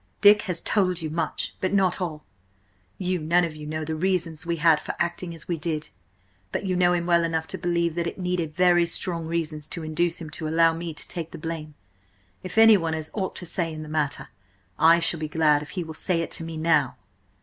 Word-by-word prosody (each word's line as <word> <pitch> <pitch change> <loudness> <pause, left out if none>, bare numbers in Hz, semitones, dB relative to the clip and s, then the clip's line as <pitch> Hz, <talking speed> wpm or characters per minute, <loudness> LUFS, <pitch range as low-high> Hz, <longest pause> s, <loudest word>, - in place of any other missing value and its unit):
"Dick 205 0 +7
has 170 -2 0
told 185 -4 +1
you 155 - -3
much, 165 +1 -2
but 185 - 0
not 190 -2 +2
all. 155 -4 -4 0.7
You 185 -1 -1
none 170 +3 +2
of 165 -2 -3
you 150 -1 -8
know 155 0 -3
the 160 - -3
reasons 170 -1 -1
we 170 - 0
had 160 -1 +4
for - - -5
acting 170 0 -3
as 165 - -11
we 170 - -1
did. 155 -1 -2 0.6
But - - -3
you 185 -1 0
know 180 0 +3
him 170 -1 0
well 170 -1 +3
enough 165 -1 -1
to 190 - -5
believe 170 -1 0
that 170 0 -2
it - - -5
needed 180 -4 -2
very 175 -1 +4
strong 170 -1 +2
reasons 155 -2 -3
to 165 - -6
induce 165 +2 0
him 155 -2 -8
to 155 0 -4
allow 165 +1 +4
me 165 -1 -5
take 165 +1 -5
the - - -9
blame. 155 -1 -6 0.7
If 185 +3 -8
anyone 210 -8 +6
has 160 -1 -4
aught 190 -3 -3
to 180 - -5
say 170 -1 -1
in 155 0 -6
the 155 - -9
matter, 155 -2 -1 0.5
I 165 +1 +7
shall 170 -1 +1
be 155 - -3
glad 150 -2 +3
if 150 - -9
he 180 - 0
will 160 -1 -8
say 165 +2 0
it 165 - -5
to - - -2
me–now!" 160 -4 +1
165 Hz, 225 wpm, -25 LUFS, 155-175 Hz, 0.7 s, Dick